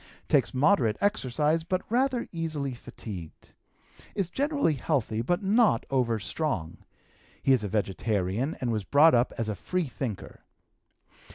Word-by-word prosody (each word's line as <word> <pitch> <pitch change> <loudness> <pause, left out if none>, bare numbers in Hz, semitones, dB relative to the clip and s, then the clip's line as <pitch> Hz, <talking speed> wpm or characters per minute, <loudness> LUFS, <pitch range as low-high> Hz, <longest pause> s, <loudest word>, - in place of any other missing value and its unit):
Takes 130 -8 +3
moderate 130 - +3
exercise, 160 - +1
but 185 +2 -1
rather 250 +1 +1
easily 155 -5 -3
fatigued. 95 -8 -10 0.6
Is 195 -4 -1
generally 285 - +1
healthy, 125 -5 -1
but 175 - 0
not 205 - +3
overstrong. 120 - -1 0.7
He 135 - +5
is 125 -5 +2
a - - -1
vegetarian, 105 - -1
and 125 -2 -1
was 110 -2 -1
brought 145 - +5
up 120 0 +3
as 115 - -1
a 105 - -1
free 180 - -2
thinker. 125 -6 -6
135 Hz, 130 wpm, -28 LUFS, 110-175 Hz, 0.7 s, He